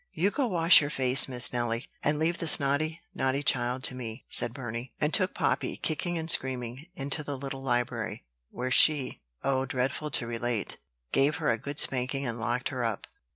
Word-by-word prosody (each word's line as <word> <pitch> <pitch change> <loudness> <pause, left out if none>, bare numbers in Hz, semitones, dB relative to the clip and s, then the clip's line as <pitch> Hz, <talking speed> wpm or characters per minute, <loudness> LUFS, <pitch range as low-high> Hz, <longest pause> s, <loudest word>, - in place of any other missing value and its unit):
"You 185 +6 +1
go 275 +1 0
wash 170 -5 +6
your 145 - -2
face, 130 -1 +4
Miss 125 -2 0
Nelly, 120 +1 -2 0.2
and 150 +1 +1
leave 165 +3 0
this 165 -3 +3
naughty, 155 +4 -1
naughty 135 +2 -1
child 125 -1 +1
to - - +4
me," 120 -1 -7
said 120 - +3
Burney; 120 -1 -7
and 150 +1 0
took 185 -2 +2
Poppy, - - -1
kicking 170 +2 -2
and 160 0 -4
screaming, 130 -1 0
into 140 +2 -2
the 145 -2 -5
little 135 0 -6
library, 120 -2 -2 0.2
where 125 +2 -4
she 145 -1 +5 0.2
oh, 135 -1 0
dreadful 135 +4 -2
to 130 - +1
relate! 115 -1 -3 0.3
gave 140 +2 +3
her 155 -2 -1
a 115 -1 +1
good 140 +4 -7
spanking, 135 0 +1
and 120 -1 -4
locked 120 +2 -2
her 130 -3 -3
up. 115 -3 -3
135 Hz, 190 wpm, -28 LUFS, 125-150 Hz, 0.3 s, wash